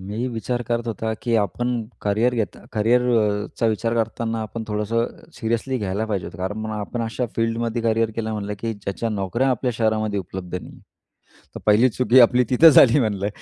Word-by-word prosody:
मी 105 +6 -4
विचार 120 +1 -3
करत 120 0 -1
होतो 110 0 -2
की 120 -1 0
आपण 110 +4 -1 0.3
करियर 110 +5 +1
घेता 105 -6 -3
करियरचा 115 -1 +1
विचार 115 +2 -1
करताना 115 0 -1
आपण 110 +1 -6
थोडंसं 105 +3 0 0.3
सीरियसली 115 +3 -1
घ्यायला 100 +1 -2
पाहिजे 100 -5 -2
होतं. 85 - -10
कारण 95 +4 -3
मग 110 0 -4
आपण 110 +3 -4
अशा 115 +2 -2
फिल्डमध्ये 115 +1 -1
करियर 115 0 +1
केलं 110 -1 -2
म्हणलं 105 -1 -4
की 115 +1 -2
ज्याच्या 100 +3 -4
नोकऱ्या 105 +5 -1
आपल्या 125 0 0
शहरामध्ये 110 -2 0
उपलब्ध 90 -1 -7
नाही. - - -12 0.8
तर - - -7
1ली 110 +4 +5
चुकी 125 +1 +4
आपली 125 +1 +5
तिथं 155 +6 +7
झाली 135 -1 +7
म्हणलं. 100 -4 -1
115 Hz, 175 wpm, -22 LUFS, 105-120 Hz, 0.8 s, तिथं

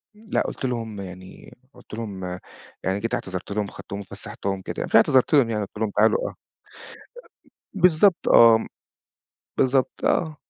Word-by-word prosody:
لأ، 215 +1 -2
قُلت - - -4
لهم 115 -4 -4
يعني 95 -1 -11 0.2
قُلت - - -17
لهم 105 -4 -6 0.6
يعني، 95 +1 -1
جيت 115 +3 -4
اعتذرت 95 -5 -4
لهم 105 0 -1
أخدتهم 100 0 -8
وفسحتهم 95 0 -5
كده. - - -4
مش - - -2
اعتذرت 130 +3 +4
لهم 135 -6 +5
يعني 110 -2 -1
قلت 100 - -15
لهم 110 0 -1
تعالوا 460 - +3
آه. - - -9
أ - - -21 1.4
بالضبط 180 0 +3
آه، 115 -1 +7 0.9
بالضبط 130 0 +1
آه. 160 -3 +1
115 Hz, 150 wpm, -23 LUFS, 100-135 Hz, 1.4 s, آه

